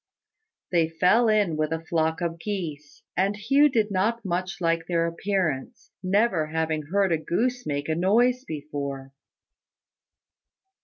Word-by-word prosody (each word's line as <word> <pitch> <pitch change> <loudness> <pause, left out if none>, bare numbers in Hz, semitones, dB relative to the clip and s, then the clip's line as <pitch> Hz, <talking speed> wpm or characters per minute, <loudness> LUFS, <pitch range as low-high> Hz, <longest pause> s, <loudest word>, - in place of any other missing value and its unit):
They 165 -3 +2
fell 185 +8 +3
in 205 -7 +2
with 155 0 -1
a 165 - -1
flock 160 0 0
of 170 -1 -2
geese, 155 -7 -5
and 195 +2 +1
Hugh 275 +8 +4
did 220 -5 +1
not 220 +4 0
much 185 +1 -2
like 165 -1 0
their 170 -1 +1
appearance, 170 -5 -2
never 190 -3 +1
having 160 -1 -2
heard 195 +2 +1
a 165 - +2
goose 245 +9 -1
make 145 0 -2
a 160 - +1
noise 235 +9 +2
before. 140 - -6
175 Hz, 140 wpm, -25 LUFS, 160-205 Hz, -, Hugh